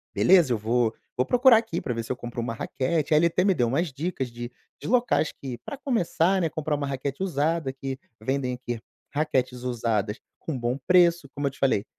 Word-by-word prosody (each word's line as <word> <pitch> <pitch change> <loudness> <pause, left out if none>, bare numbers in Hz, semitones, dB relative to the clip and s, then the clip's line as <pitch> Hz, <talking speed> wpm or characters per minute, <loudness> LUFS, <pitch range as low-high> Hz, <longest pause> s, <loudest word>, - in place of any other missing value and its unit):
beleza. 175 -9 +5
Eu - - +1
vou 115 +1 +1 0.2
vou 125 - +2
procurar 250 -1 +6
aqui 225 0 -2
pra 125 - -2
ver 115 0 -3
se - - -6
eu 130 - 0
compro 120 -1 -5
uma 115 0 -3
raquete". 150 +7 -1
Aí 150 - +6
ele 170 - +4
até 180 +2 +1
me 195 - +4
deu 120 -7 +1
umas 140 +4 0
dicas 140 -5 -3
de 120 +1 -7 0.3
de - - -6
locais 240 - +2
que, 130 -3 -5
pra 285 - -6
começar, 190 - +1
né, 165 - +1
comprar 155 -1 -2
uma 145 -1 -3
raquete 140 +4 -3
usada, 160 -4 0
que 135 0 -5 0.2
vendem 130 +1 -1
aqui 120 -2 -5 0.3
raquetes 130 -4 0
usadas 115 -3 -1 0.2
com 155 -5 -4
bom 120 +2 -1
preço. 175 -4 +4
Como 145 0 -1
eu - - -1
te 135 - -18
falei, 120 -7 +2
140 Hz, 215 wpm, -26 LUFS, 125-170 Hz, 0.3 s, procurar